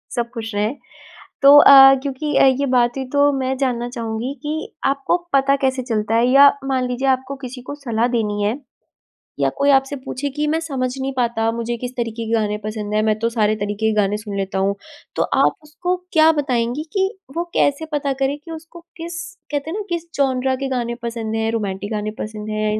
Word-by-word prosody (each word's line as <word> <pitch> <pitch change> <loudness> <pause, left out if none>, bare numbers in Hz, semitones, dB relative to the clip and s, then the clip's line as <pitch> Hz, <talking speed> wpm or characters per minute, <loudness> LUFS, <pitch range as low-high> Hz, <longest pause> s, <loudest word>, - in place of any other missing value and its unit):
सब 235 -1 -1
खुश 225 -2 -6
रहें। 210 +6 0 0.7
तो 280 +1 +9
अ, 270 -1 +9
क्योंकि 280 +1 -3
अ, - - +6
ये 265 +1 +3
बात 245 -1 +2
ही 265 - -3
तो 285 0 +4
मैं 260 0 -1
जानना 245 -3 -1
चाहूँगी 235 +1 -4
कि 310 +1 -4
आपको 275 +5 +1 0.2
पता 275 0 +4
कैसे 260 -1 0
चलता 220 -2 -1
है 235 +2 +3
या 275 +2 +8 0.2
मान 260 -2 0
लीजिए 250 +2 -2
आपको 260 +1 -1
किसी 250 0 -8
को 285 +3 -7
सलाह 240 -5 -1
देनी 210 -2 -1
है 215 +6 0 0.8
या - - +2
कोई 280 +1 +2
आपसे 270 +1 +2
पूछे 265 +2 -4
कि 300 +2 -2
मैं 320 +2 +1
समझ 265 -5 -2
नहीं 270 +1 -2
पाता 230 -2 +1
मुझे 235 0 -3
किस 250 +1 -5
तरीके 230 -1 -3
के 225 - -2
गाने 210 -2 0
पसंद 210 -1 -4
हैं 215 - +2
मैं 215 -1 +1
तो 230 +1 0
सारे 215 -2 +1
तरीके 205 +1 -2
के - - -1
गाने 205 +1 0
सुन 210 -2 -7
लेता 195 0 -2
हूँ। 195 +1 +1 0.4
तो - - +2
आप - - +2
उसको 355 +4 -2 0.2
क्या 320 -1 +6
बताएँगे 250 +1 -1
कि 385 -1 +2 0.3
वो 340 - +1
कैसे 285 +3 +1
पता 280 -1 0
करें 275 +2 +1
कि 330 +3 -12
उसको 325 +1 -10 0.2
किस 335 0 -6 0.3
कहते 295 +2 -2
हैं 395 - -3
ना 425 - -3
किस 340 -1 -4
जॉनरा 265 -1 +1
के 275 0 -3
गाने 240 -2 -2
पसंद 225 -2 -4
हैं, 225 0 0
रोमांटिक 205 -1 -3
गाने 210 0 -2
पसंद 215 0 -6
हैं 215 0 -1
255 Hz, 210 wpm, -20 LUFS, 220-280 Hz, 0.8 s, तो